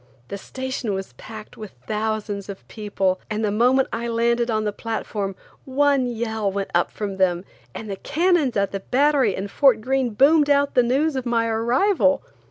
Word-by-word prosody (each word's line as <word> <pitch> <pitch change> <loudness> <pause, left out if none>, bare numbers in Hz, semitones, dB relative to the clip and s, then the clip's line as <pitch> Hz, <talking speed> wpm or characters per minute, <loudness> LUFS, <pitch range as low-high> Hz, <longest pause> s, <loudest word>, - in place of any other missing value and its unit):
The 200 - -4
station 260 -3 -4
was 190 0 -6
packed 215 -1 -11
with 215 -2 -9
thousands 215 -2 -3
of 195 - -9
people, 195 -3 -2
and 215 0 -1
the 205 - 0
moment 250 +5 +3
I 235 +1 -3
landed 235 +1 +1
on 215 -1 0
the 210 -1 -2
platform, 210 -3 -4 0.3
one 275 -1 +2
yell 220 -3 -2
went 195 0 -4
up 175 - +2
from 200 -2 -5
them, 180 -1 +1 0.3
and 220 - -7
the 195 -2 -5
cannons 320 - +1
at 200 0 0
the 195 - -3
Battery 265 -1 +2
and 195 +1 -5
Fort 265 -6 +4
Greene 255 -1 -1
boomed 290 +4 +5
out 285 0 +3
the 250 - +5
news 275 +5 +1
of 260 -1 -3
my 230 -1 +1
arrival. 255 - +2
230 Hz, 180 wpm, -22 LUFS, 205-265 Hz, 0.3 s, boomed